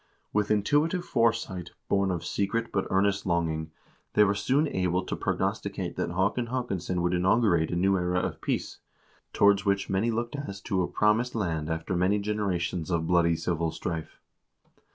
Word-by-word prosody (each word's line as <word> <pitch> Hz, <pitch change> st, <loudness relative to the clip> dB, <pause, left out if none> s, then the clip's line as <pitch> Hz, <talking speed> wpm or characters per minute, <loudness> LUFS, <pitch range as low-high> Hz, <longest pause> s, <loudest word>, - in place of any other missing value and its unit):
With 105 Hz, -1 st, +1 dB
intuitive 150 Hz, -, +2 dB
foresight, 115 Hz, -, 0 dB
born 100 Hz, -1 st, +2 dB
of 85 Hz, -2 st, -2 dB
secret 115 Hz, +5 st, -1 dB
but 95 Hz, -, -1 dB
earnest 100 Hz, +1 st, +2 dB
longing, 80 Hz, -2 st, 0 dB, 0.4 s
they 105 Hz, -, +6 dB
were 100 Hz, -1 st, +3 dB
soon 135 Hz, +9 st, +1 dB
able 90 Hz, -5 st, 0 dB
to -, -, -3 dB
prognosticate -, -, -2 dB
that -, -, -2 dB
Haakon 100 Hz, +6 st, 0 dB
Haakons 120 Hz, -8 st, -3 dB
son 90 Hz, -1 st, -1 dB
would 90 Hz, +1 st, +1 dB
inaugurate 90 Hz, -2 st, +3 dB
a -, -, -2 dB
new 95 Hz, +2 st, +3 dB
era 90 Hz, 0 st, 0 dB
of -, -, -3 dB
peace, -, -, -2 dB, 0.5 s
towards 100 Hz, 0 st, +4 dB
which 100 Hz, -2 st, 0 dB
many 95 Hz, +5 st, +1 dB
looked 120 Hz, +3 st, -2 dB
as 100 Hz, -9 st, -5 dB
to 95 Hz, -1 st, 0 dB
a 90 Hz, -, 0 dB
promised 110 Hz, +4 st, +1 dB
land 80 Hz, -7 st, -1 dB
after 80 Hz, +3 st, -2 dB
many 90 Hz, +4 st, +2 dB
generations 95 Hz, -5 st, -2 dB
of 85 Hz, -2 st, 0 dB
bloody 85 Hz, -1 st, +3 dB
civil 85 Hz, 0 st, -1 dB
strife. 80 Hz, 0 st, -5 dB
95 Hz, 170 wpm, -28 LUFS, 85-105 Hz, 0.5 s, they